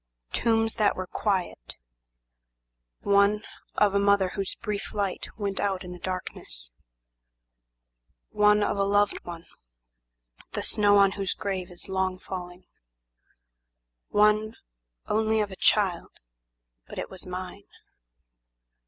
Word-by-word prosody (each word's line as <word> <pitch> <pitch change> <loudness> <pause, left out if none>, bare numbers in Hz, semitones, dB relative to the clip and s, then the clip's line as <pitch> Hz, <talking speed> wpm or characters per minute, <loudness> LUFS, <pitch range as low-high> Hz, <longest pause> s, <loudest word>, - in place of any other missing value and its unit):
"Tombs 225 -1 +2
that 210 - +3
were 185 - -4
quiet; 185 - -2 1.3
One, 200 +1 +3 0.3
of 205 -2 +3
a 200 - +3
mother, 200 -2 +4
whose 195 0 -4
brief 210 -2 -5
light 200 -3 -2
went 200 -3 -2
out 195 -2 0
in 180 - -8
the 180 - -8
darkness, - - -5 1.6
One, 210 0 +4
of - - 0
a 200 - +2
loved 205 +1 +2
one, 170 -1 -8 1.1
the - - -2
snow 205 -1 +4
on 200 -1 +6
whose 195 -1 -2
grave 190 -2 -3
is 175 - -8
long 190 -1 -1
falling, 180 -1 -8 1.4
One, 215 +1 +3 0.5
only 220 0 +1
of 205 -2 -1
a - - -7
child, 185 -4 +2 0.8
but - - -10
it - - -4
was 185 -1 -9
mine. 180 - -6
200 Hz, 120 wpm, -27 LUFS, 185-210 Hz, 1.6 s, on